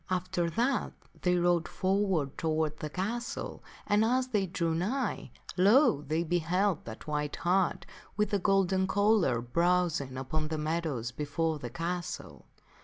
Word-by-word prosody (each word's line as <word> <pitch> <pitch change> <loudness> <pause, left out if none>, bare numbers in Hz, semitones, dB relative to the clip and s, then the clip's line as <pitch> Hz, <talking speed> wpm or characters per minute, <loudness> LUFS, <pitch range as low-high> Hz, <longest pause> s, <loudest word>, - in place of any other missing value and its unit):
After 180 -1 0
that 240 - 0 0.3
they 180 0 +2
rode 175 -1 +2
forward 190 -7 0
toward 155 -1 -1
that 150 -1 -5
castle, 230 +6 -3 0.2
and 210 +1 +3
as 255 +3 +1
they 205 -5 +1
drew 170 -2 -1
nigh, 210 +12 -1 0.3
lo! 200 - +5
they 155 +3 -1
beheld 175 +3 0
that 110 0 -8
white 150 -1 -2
hart 185 +1 +1 0.3
with 210 0 +1
the 205 - +2
golden 190 -1 +2
collar 200 - +3
browsing 165 -1 +1
upon 155 +4 -2
the 160 0 -3
meadows 155 -6 -2
before 150 +4 -2
the - - -5
castle. 170 0 -5
175 Hz, 140 wpm, -30 LUFS, 155-195 Hz, 0.3 s, lo